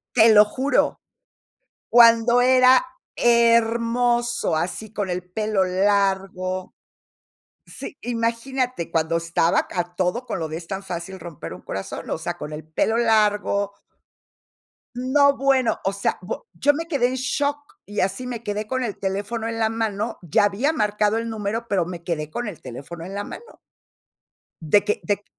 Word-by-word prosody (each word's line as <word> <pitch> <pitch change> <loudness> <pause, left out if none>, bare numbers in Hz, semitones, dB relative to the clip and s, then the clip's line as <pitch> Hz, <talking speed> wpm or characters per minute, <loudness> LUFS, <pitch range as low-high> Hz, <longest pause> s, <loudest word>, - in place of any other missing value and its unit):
Te 225 -1 +7
lo 210 0 +9
juro, 260 +7 0 0.9
cuando 235 0 +6
era 255 +1 +5 0.3
hermoso, 235 -1 +2
así 185 +6 -3
con 205 -3 -2
el 180 0 -2
pelo 210 -1 +1
largo 190 -1 0 1.0
Sí, 290 - -9
imagínate, 235 -3 -2
cuando 165 0 +1
estaba 165 0 +1
a 175 0 -3
todo 185 +7 0
con - - -4
lo 160 - -2
de 155 0 -5
"Es 165 0 -9
tan 195 0 -5
fácil 180 +1 -6
romper 160 - -8
un 90 +1 -10
corazón", 95 0 -6
o - - 0
sea, 170 +2 -4
con 150 - -7
el 155 +1 -7
pelo 160 +8 0
largo 210 -3 +2 1.2
No, 280 +3 +3
bueno, 270 -3 +2
o 195 - +1
sea, 195 0 -1
bu 190 - -6
yo 290 - +3
me 330 +3 -4
quedé 280 -7 +2
en 255 - -2
shock, 285 +3 -1 0.3
y 205 +1 -3
así 195 +7 -1
me 240 -2 -5
quedé 210 -1 -3
con 260 +3 -2
el 220 -5 -4
teléfono 200 +4 -3
en 230 0 -3
la 220 - +3
mano, 220 -2 -2
ya 175 +3 +2
había 225 +10 0
marcado 210 -5 +1
el 230 0 -3
número, 220 +1 -3
pero 190 -5 +1
me 175 -1 -7
quedé 160 -3 -3
con 240 +9 -4
el 190 - -8
teléfono 140 +7 -8
en 190 +3 -8
la 200 - -2
mano. 470 - -10 1.2
De 205 - +6
que 210 - -1
de 205 0 -1
210 Hz, 165 wpm, -23 LUFS, 185-240 Hz, 1.2 s, lo